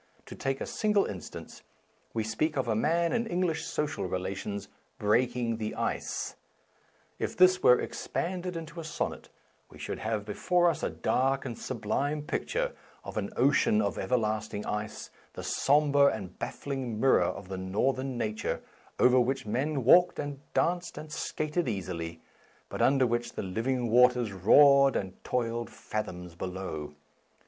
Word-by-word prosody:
To - - -9
take 135 0 -2
a - - -3
single 210 -2 +1
instance: 95 -3 -8 0.5
we 110 - -1
speak 140 +8 -1
of 130 - 0
a 110 - +1
man 165 +8 +2
in 235 -1 0
English 175 -4 0
social 150 -10 -2
rela 95 +2 -2
tions 100 0 -5 0.3
breaking 120 +2 +1
the 110 -1 -4
ice." - - -2 0.8
If - - -3
this 185 0 +6
were 125 - +6
ex - - -5
panded 180 0 -2
into 165 +1 -7
a - - -5
sonnet, 155 -1 -4 0.4
we - - -14
should - - -5
have 110 -2 -2
be 105 - -4
fore 175 - +3
us 155 - -6
a - - 0
dark 135 +1 0
and 120 - -4
sublime 135 +7 -2
picture - - -1 0.3
of - - -8
an - - -2
ocean 220 -2 +4
of - - -1
everlasting 110 -3 -1
ice, 105 0 -4 0.2
the - - -7
sombre 145 0 +3
and 100 -8 -3
baffling 130 -6 -4
mirror 135 +3 +5
of 95 - -2
the 95 0 -5
Northern 130 +7 -1
nature, 110 -2 -2 0.3
over 125 0 +5
which 130 +1 0
men 130 +6 -1
walked 175 +9 +6
and 145 -2 -4 0.2
danced 175 -1 0
and 155 0 -8
skated 155 0 -2
easily, 85 -5 -4 0.5
but - - -4
under 135 -1 +4
which 120 0 -1
the - - -4
living 115 +5 -1
waters 125 -2 +5
roared 140 +8 +6
and 95 -2 -4
toiled 120 -1 -1
fathoms 90 -5 -5
below. 85 -4 -5
125 Hz, 155 wpm, -29 LUFS, 105-150 Hz, 0.8 s, this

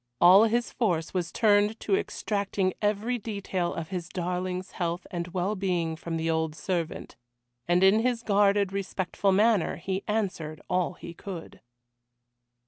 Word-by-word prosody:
All 190 +5 +8
his 235 +2 0
force 175 -9 0
was 180 -3 -2
turned 210 0 +3
to 200 - +2
extracting 200 -2 -1
every 215 +4 0
detail 195 -5 -2
of 165 -1 -5
his 180 -3 -4
darling's 180 +1 -3
health 175 0 -3
and 170 -1 -3
well 185 +3 -1
being 180 -5 -1
from 165 +1 -4
the 160 0 -2
old 160 -1 0
servant, 170 -2 -3 0.5
and 175 +2 +3
in 195 +3 +6
his 240 0 0
guarded, 200 -2 +3
respectful 195 0 -1
manner 210 -2 +3
he 195 0 -3
answered 190 -8 -2
all 180 -1 0
he 170 -1 -9
could. 175 -2 -8
190 Hz, 145 wpm, -27 LUFS, 175-205 Hz, 0.5 s, All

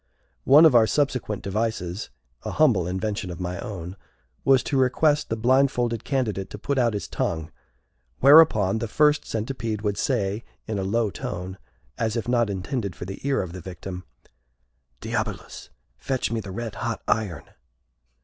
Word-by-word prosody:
One 150 +5 +8
of 155 - +6
our 115 -2 +6
subsequent 125 -8 -1
devices 100 -2 -2 0.3
a - - -4
humble 120 - +3
invention 95 +1 -3
of 85 - -7
my 90 +1 -4
own 90 -3 -6 0.5
was 135 -2 +4
to - - -2
request 145 +3 +2
the 115 - 0
blindfolded 120 -1 +2
candidate 110 -8 -2
to - - -8
put 135 +6 -1
out 120 -3 +2
his 100 - -4
tongue, 80 -1 -3 0.7
whereupon 125 -8 +6
the 115 - -3
First 150 +6 +3
Centipede 110 -2 -3
would 105 -1 -1
say, 105 -4 -1 0.2
in 110 -2 -3
a - - -2
low 105 +2 0
tone, 95 +2 -6 0.4
as 110 -1 0
if 115 - -3
not 120 -3 +2
intended 100 - -3
for - - -7
the 95 +1 -7
ear 135 -6 +1
of 85 -2 -8
the 95 - -7
victim, 90 +1 -7 1.0
"Diabolus, - - -4 0.3
fetch 130 - -2
me 115 - -1
the 105 -3 -7
red 110 +3 -5
hot - - -3
iron!" 105 -6 -1
110 Hz, 160 wpm, -24 LUFS, 95-125 Hz, 1.0 s, One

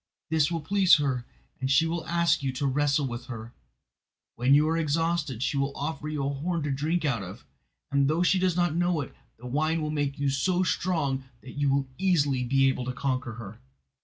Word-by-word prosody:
This 155 -2 +3
will 165 -1 -2
please 190 +3 +5
her, 135 -5 -1 0.3
and 130 - -2
she 150 +4 +4
will 165 0 -3
ask 170 -2 +2
you 135 -1 -1
to 135 +2 -2
wrestle 140 +1 +1
with 120 -1 -6
her. 115 -2 -8 0.8
When 130 +3 +4
you 150 +2 +4
are 160 - +1
exhausted, 160 -5 0
she 140 - -1
will 140 0 -1
offer 155 +1 -4
you 150 -3 -2
a - - 0
horn 165 +3 -2
to 145 - -1
drink 155 +5 -1
out 125 -7 0
of, 95 -1 -9 0.5
and 140 -1 +3
though 160 +4 +2
she 185 +1 +3
does 180 -2 +1
not 175 -2 +1
know 175 -2 +1
it, 135 - -8 0.2
the 120 - -13
wine 155 +6 0
will 155 -1 -2
make 145 -2 -1
you 140 -1 0
so 180 +7 +1
strong 150 -8 -1 0.2
that 130 - -11
you 145 -1 0
will 135 0 +1
easily 145 -9 +2
be 135 +2 +3
able 130 -2 -1
to 125 - -3
conquer 130 -2 -2
her. 110 -1 -9
145 Hz, 215 wpm, -27 LUFS, 135-165 Hz, 0.8 s, please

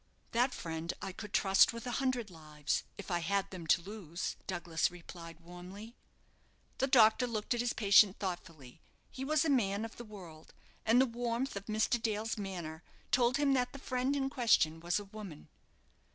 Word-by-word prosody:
"That 245 +3 +2
friend 165 0 -4
I 195 - -5
could 210 +2 -9
trust 195 +2 +5
with 230 +1 -7
a 245 - -3
hundred 250 -6 -1
lives, 155 -3 -3
if 200 - -7
I 175 - +1
had 195 +3 -1
them 175 -4 -7
to 170 - +4
lose," 185 -4 -5
Douglas 175 -3 0
replied, 165 -1 -11
warmly. 180 +7 -10 0.8
The 270 - +2
doctor 245 -1 +5
looked 220 0 -2
at 240 - -2
his 240 0 0
patient 200 -1 +5
thoughtfully. 165 -9 -6 0.3
He 265 - -6
was 310 +3 +2
a - - +1
man 210 -5 +1
of 225 - -10
the 240 - -7
world, 180 -8 -12 0.3
and 230 +3 +6
the 260 - +6
warmth 240 +1 -2
of 200 0 -6
Mr. 220 +2 +1
Dale's 220 0 -1
manner 175 -6 -5 0.3
told 245 +1 +3
him 285 -1 +3
that 250 -1 +1
the - - -7
friend 260 +1 -1
in 270 -1 -1
question 185 - +3
was 170 +1 0
a 205 - -8
woman. 200 -6 -10
205 Hz, 180 wpm, -33 LUFS, 175-240 Hz, 0.8 s, and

